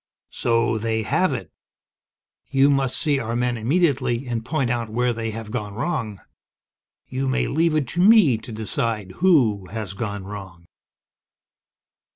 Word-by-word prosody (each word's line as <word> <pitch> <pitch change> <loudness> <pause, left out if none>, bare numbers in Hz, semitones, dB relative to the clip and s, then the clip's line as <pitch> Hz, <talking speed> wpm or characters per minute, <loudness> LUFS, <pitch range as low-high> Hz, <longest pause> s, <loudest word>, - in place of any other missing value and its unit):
"So 115 -1 +1
they 110 0 -1
have - - +1
it! - - -5 1.0
You 140 +1 +4
must 135 -2 +1
see 145 -3 +1
our 115 -1 -3
men 120 0 0
immediately, 130 -1 +1
and 120 -2 -3
point 135 -1 -1
out 120 -2 -2
where 120 +2 0
they 115 0 -3
have 110 -1 -7
gone 105 -2 -4
wrong. 115 - -3 0.9
You 135 +1 -2
may 130 +1 +1
leave 160 +2 +1
it 150 -4 +1
to 175 - -3
me 190 - +6
to 115 - -10
decide 110 -2 -3
who 125 - +3
has 110 -3 -5
gone 100 -1 -4
wrong!" 95 -4 -9
115 Hz, 150 wpm, -23 LUFS, 110-135 Hz, 1.0 s, me